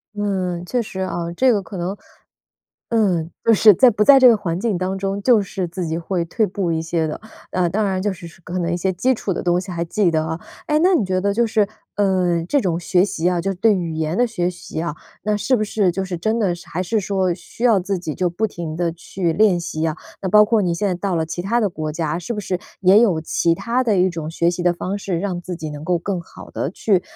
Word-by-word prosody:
嗯， 185 -4 -2
确 245 +6 0
实 190 -4 -6
啊。 175 -2 -3
这 260 +6 +4
个 210 -4 +1
可 195 0 -9
能， 180 +3 -3 0.9
嗯， 185 -8 +1
就 230 - +5
是 215 +1 +7
在 250 +7 +6
不 210 -1 0
在 275 +4 +8
这 260 -1 +8
个 230 - +6
环 175 -4 -3
境 210 0 0
当 185 +1 -2
中， 195 +1 -2
就 235 -1 +5
是 190 -2 -4
自 175 0 -4
己 160 +1 -2
会 170 0 -2
退 215 +6 0
步 185 -2 -2
一 160 - 0
些 165 0 -1
的， 155 - -5 0.3
呃， 180 -1 +1
当 210 +5 0
然 190 -1 -1
就 205 0 0
是 180 -1 -10
说 170 - -14
可 180 +1 -4
能 170 -1 -1
一 - - +1
些 190 +2 0
基 255 +9 +1
础 205 -4 -3
的 - - -3
东 175 0 +2
西 190 - -8
还 170 -1 -2
记 185 +1 +1
得 155 -1 0
啊。 160 +1 -4 0.3
哎， 300 0 +2
那 370 +2 +4
你 255 - +2
觉 185 0 0
得 200 +1 +1
就 235 +3 +2
是， 215 -2 +1 0.3
嗯， 180 -4 +1
这 285 - +3
种 175 -6 0
学 180 +1 +2
习 175 -4 -1
啊， 180 -1 0
就 195 +3 -1
是 - - -2
对 210 +3 +3
语 170 -3 -2
言 160 +1 -2
的 245 - +4
学 180 -7 -1
习 175 -2 -7
啊， 165 -2 -3 0.3
那 210 0 0
是 255 +5 +1
不 215 - -1
是 200 -3 +1
就 190 +2 -2
是 185 -2 -4
真 220 +7 0
的 195 -6 +1
是 175 - -13
还 180 - -2
是 215 +4 0
说， 190 -2 0
需 195 +6 -8
要 230 -5 +5
自 190 +1 -2
己 160 -4 -5
就 180 - 0
不 210 +6 -1
停 170 -6 -6
地 170 0 0
去 170 +1 -3
练 195 -2 +3
习 160 -1 -2
啊？ 160 - -2 0.3
那 190 - -1
包 210 +3 +7
括 220 -1 +2
你 175 -2 0
现 205 +4 -1
在 185 - 0
到 185 +1 -2
了 160 -1 +1
其 175 +2 -4
他 230 +6 +1
的 210 - +2
国 155 -4 -4
家， 160 0 -2
是 175 +6 -4
不 210 - -3
是 185 -2 -2 0.2
也 190 +3 +6
有 190 -9 +3
其 165 +1 +1
他 240 +8 -1
的 220 -4 +2
一 185 +1 +4
种 160 -2 -5
学 170 +1 +1
习 175 0 -4
的 175 - +3
方 185 +3 -4
式， 185 -4 -2
让 185 -2 -2
自 180 +1 -6
己 155 -2 -6
能 150 0 -8
够 175 0 +1
更 185 +1 -3
好 170 - -13
地 140 - -3
去 195 -1 +1
185 Hz, 290 characters per minute, -20 LUFS, 170-205 Hz, 0.9 s, 在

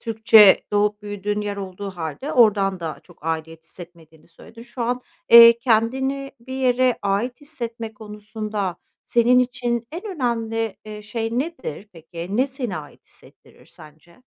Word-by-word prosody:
Türkçe 220 -3 +5
doğup 210 0 +1
büyüdüğün 205 0 -3
yer 205 -1 -4
olduğu 195 0 -6
hâlde 175 - -6
oradan 200 -5 +3
da 160 -2 -5
çok 175 -3 -20
aidiyet 160 0 -4
hissetmediğini 165 -2 -14
söyledin. 230 +7 -15
Şu 240 +1 -7
an, 245 +2 -1 0.3
eee, 235 0 +10
kendini 265 +4 0
bir 260 +2 -10
yere 255 -1 +2
ait 205 +7 -1
hissetme 235 -6 -7
konusunda 210 -2 -5 0.3
senin 240 +1 +3
için 240 -2 -1
en 340 +3 -6
önemli, 225 -4 -2
eee, 210 -1 -9
şey 225 +2 -3
nedir 260 - -5
peki? 165 0 -9
Ne 250 +6 +1
seni 260 -7 -5
ait 150 -2 -11
hissettirir - - -17
sence? 155 - -17
220 Hz, 140 wpm, -22 LUFS, 195-240 Hz, 0.3 s, eee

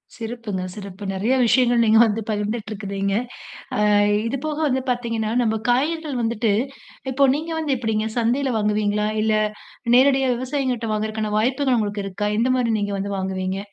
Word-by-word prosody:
சிறப்புங்க. 225 -4 -5
சிறப்பு. 200 -1 -9
நெறையா 215 +7 +1
விஷயங்கள் 240 0 +4
நீங்க 220 0 +5
வந்து 220 0 -1
பகிர்ந்துட்டு 215 +1 -2
இருக்குறீங்க. 200 -1 -3 0.6
ஆ - - -1 0.5
இதுபோக 285 +5 -3
வந்து 260 -1 0
பார்த்தீங்கன்னா, 230 -3 -1
நம்ம 220 -1 +1
காய்கறிகள் 295 +1 0
வந்துட்டு 225 -1 +1 0.6
இப்போ 275 +2 +4
நீங்க 320 +3 -5
வந்து 305 -4 0
எப்பிடிங்க 220 -2 -1
சந்தையில 250 +3 +1
வாங்குவீங்களா? 210 0 +1
இல்ல 220 0 +2 0.6
நேரடியா 265 0 +4
விவசாயிங்கக்கிட்ட 255 -3 -2
வாங்குறக்கான 215 0 -2
வாய்ப்புகள் 260 +3 +1
உங்களுக்கு 205 -2 -2
இருக்கா? 205 +2 -2
எந்த 245 +3 +2
மாரி 235 -2 +1
நீங்க 205 0 -2
வந்து 200 +1 -3
வாங்குவீங்க? 190 0 -2
225 Hz, 145 wpm, -22 LUFS, 210-255 Hz, 0.6 s, நீங்க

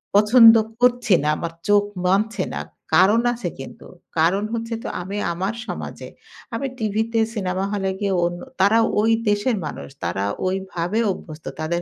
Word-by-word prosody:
পছন্দ 225 +2 +8 0.3
করছি 245 -3 +3
না। - - 0
আমার 165 0 -5
চোখ 205 0 +5 0.2
মানছে 200 +1 +1
না। - - -3 0.3
কারণ 210 +7 +5
আছে 230 -7 -4
কিন্তু। 135 - -10 0.3
কারণ 180 +5 +3
হচ্ছে 230 0 -3
তো - - -4
আমি 195 +3 -5 0.2
আমার 190 +5 -2
সমাজে - - -6 0.5
আমি 275 +4 -2
টিভিতে 220 +1 0
সিনেমা 190 -3 -2
হলে 195 -2 -1
গিয়ে 200 -2 0
অন 175 - -1 0.3
তারা 200 +4 +5 0.2
ওই 225 - +2 0.2
দেশের 205 +4 +1
মানুষ 150 - -7
তারা 90 +3 -1 0.2
ওইভাবে 190 +1 -2
অভ্যস্ত 155 -3 -9
তাদের 170 +2 -1
200 Hz, 150 wpm, -22 LUFS, 180-225 Hz, 0.5 s, পছন্দ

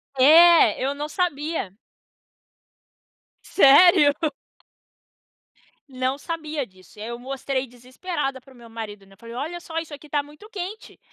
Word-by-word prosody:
É. 325 +4 +6
Eu 275 +2 0
não 295 +1 -5
sabia. 310 - -2 1.7
Sério? 290 -1 +6 1.8
Não 260 0 -2
sabia 310 -3 -5
disso. 185 +2 -20
E - - -9
aí 220 - -6
eu 235 - -5
mostrei 265 +1 -4
desesperada 260 +3 -5
para 265 +1 -19
o - - -19
meu 235 -1 -15
marido, 210 -3 -8
né. 195 0 -20
Falei: 230 +2 -11
"Olha 325 +7 -5
só, 325 -1 -8
isso 320 -2 -9
aqui 290 +1 -12
tá 290 0 0
muito 300 +9 -16
quente". 405 +1 -8
280 Hz, 140 wpm, -23 LUFS, 250-325 Hz, 1.8 s, É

